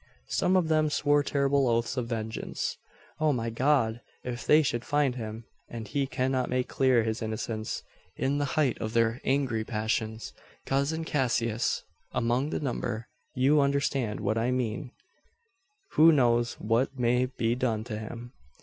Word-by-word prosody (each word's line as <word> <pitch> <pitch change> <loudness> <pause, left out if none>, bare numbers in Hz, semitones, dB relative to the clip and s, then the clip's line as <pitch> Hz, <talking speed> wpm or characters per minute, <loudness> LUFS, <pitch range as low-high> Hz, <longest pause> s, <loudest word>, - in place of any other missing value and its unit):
Some 185 - +2
of 175 -3 +2
them 155 -1 +3
swore 145 0 +3
terrible 140 -1 +2
oaths 115 +2 +1
of 125 -3 -2
vengeance. 110 -1 -3 0.4
O 155 -1 +3
my 115 -3 -1
God! 120 -2 +2 0.2
if 125 -1 -5
they 155 +1 +6
should 120 -4 -1
find 145 -2 +1
him, 110 -2 -6 0.2
and 115 -2 -6
he 140 +5 -1
cannot 130 -1 0
make 125 0 0
clear 130 -4 +3
his 110 +2 -2
innocence, 110 0 -3 0.3
in 140 +2 0
the 145 - +1
height 145 -5 +2
of 110 0 -3
their 115 +1 +2
angry 130 -5 +1
passions 110 0 -2 0.3
cousin 140 +4 0
Cassius 120 -6 0 0.3
among 120 +5 +1
the - - -2
number 120 -4 -3 0.3
you 140 +4 +4
understand 140 -6 0
what 110 +2 0
I 115 +2 +1
mean 125 0 -2 1.0
who 165 +2 +7
knows 120 -4 +3
what 120 +5 0
may 125 +1 +2
be 120 -3 -1
done 120 -3 -1
to 110 -2 -5
him? 120 +2 -8
125 Hz, 155 wpm, -28 LUFS, 115-140 Hz, 1.0 s, who